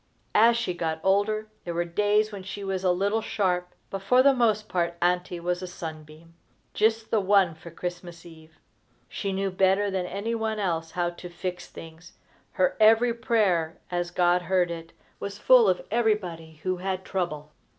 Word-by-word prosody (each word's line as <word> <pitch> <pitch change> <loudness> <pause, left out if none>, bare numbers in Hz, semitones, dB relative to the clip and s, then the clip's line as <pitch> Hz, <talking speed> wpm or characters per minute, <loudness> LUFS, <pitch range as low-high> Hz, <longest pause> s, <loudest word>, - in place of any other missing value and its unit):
As 230 +2 +5
she 230 -6 -1
got 165 -2 -2
older, 210 +3 +1 0.2
there 170 -1 -5
were 175 0 0
days 210 +4 +1
when 200 -2 -7
she 195 +2 -7
was 190 -1 -3
a 185 - +3
little 200 +5 0
sharp, 180 -4 -1 0.2
but 195 - -4
for 250 +6 +4
the 275 0 +6
most 215 -4 +1
part 170 -3 -1
Auntie 180 0 0
was 175 +1 -2
a 185 - -5
sunbeam 160 -1 -9 0.4
just 220 +1 +1
the 220 - +3
one 195 -3 +3
for 160 +2 -12
Christmas 175 0 -7
eve. 160 -1 -15 0.5
She 200 - -4
knew 195 0 -1
better 195 +2 +2
than 185 -2 -2
any 200 +5 -3
one 220 -1 -2
else 165 -5 -1
how 175 0 -1
to 175 +1 -10
fix 180 +1 -5
things. 165 +1 -12 0.4
Her 185 - +1
every 225 +2 +5
prayer, 200 -9 +1
as 175 0 -1
God 175 0 +2
heard 180 0 +1
it, 165 -1 -7 0.3
was 200 0 -5
full - - +6
of - - 0
everybody 180 -9 -1
who 185 0 -1
had 185 0 -3
trouble. 155 -5 -3
185 Hz, 180 wpm, -26 LUFS, 175-210 Hz, 0.5 s, the